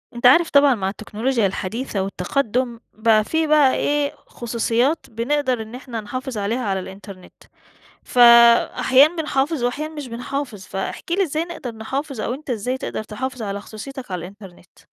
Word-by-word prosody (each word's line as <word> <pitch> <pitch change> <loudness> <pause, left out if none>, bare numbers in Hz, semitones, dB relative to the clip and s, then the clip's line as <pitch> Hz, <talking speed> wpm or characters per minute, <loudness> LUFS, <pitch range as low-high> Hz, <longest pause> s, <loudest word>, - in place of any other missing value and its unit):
أنت 240 - -4
عارف 325 +6 +6
طبعًا 280 -2 +5
مع 190 -2 -2
التِّكنُولُوجيا 220 +3 -1
الحديثة 200 +3 -3
والتَّقدُّم، 235 +5 -1
بقى 215 -1 +3
في 320 +7 0
بقى 295 -3 +4
إيه 290 0 0
خصوصيَّات 240 +5 -1
بنقدر 255 +1 -1
إن 220 +2 -9
إحنا 250 -3 -6
نحافظ 255 +3 -5
عليها 210 +4 -1
على 195 -2 0
الإنترنت، 190 0 -11 0.7
ف - - -10 0.6
أحيانًا 280 +6 +5
بنحافظ 300 -3 -1
وأحيانًا 300 +6 -2
مش 295 -3 -6
بنحافظ، 245 -2 -5
فاحكِ 195 - -5
لي 385 +3 +3
إزاي 315 -2 -1
نقدر 265 -9 -7
نحافظ؟ 265 +3 -4
أو 235 - -2
أنت 285 +2 -10
إزاي 250 +2 -2
تقدر 240 - -5
تحافظ 255 +4 -5
على 200 -1 -4
خصوصيَّتك 250 +3 -9
على 180 - -2
الإنترنت؟ 185 0 -13
245 Hz, 155 wpm, -21 LUFS, 215-280 Hz, 0.7 s, عارف